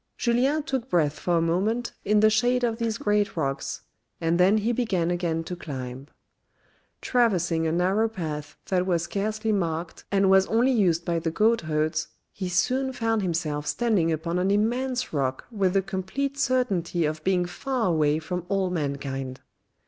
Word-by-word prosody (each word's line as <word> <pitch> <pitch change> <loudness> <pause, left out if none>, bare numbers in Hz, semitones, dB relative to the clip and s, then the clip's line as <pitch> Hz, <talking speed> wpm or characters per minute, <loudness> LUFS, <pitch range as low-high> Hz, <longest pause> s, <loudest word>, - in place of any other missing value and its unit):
Julien 260 +6 +1
took 265 -4 -3
breath 150 -4 +1
for 175 -1 +1
a - - +2
moment 210 +8 0
in 210 0 +3
the 215 0 +5
shade 245 +3 +2
of 230 -1 0
these 230 -1 -1
great 210 -3 0
rocks, 135 -3 -2 0.4
and 165 +1 +1
then 190 +4 +5
he 220 +3 +1
began 200 -8 0
again 170 -2 -1
to 180 - -5
climb. 130 -5 -7 0.9
Traversing 180 -9 +1
a - - 0
narrow 190 +6 +2
path 155 -8 -5
that 185 -1 +1
was 170 -3 +1
scarcely 215 +5 -2
marked, 170 -4 -2
and 195 -1 +3
was 190 0 +5
only 240 +4 +3
used 175 -8 +2
by 170 -1 0
the 165 - -1
goat 220 +7 +2
herds, 155 0 -1 0.2
he 185 -2 -4
soon 255 +9 +1
found 225 -2 0
himself 160 -5 -2
standing 210 -9 +1
upon 170 +3 -1
an 185 +2 +1
immense 245 +4 0
rock 135 -3 -1
with 195 -5 +1
the 195 -1 +2
complete 195 +10 -3
certainty 225 - 0
of 155 +1 -3
being 185 -1 +2
far 255 +6 -2
away 155 -3 +2
from 180 +3 -4
all 195 -2 0
mankind. 140 -4 -3
185 Hz, 170 wpm, -26 LUFS, 165-225 Hz, 0.9 s, the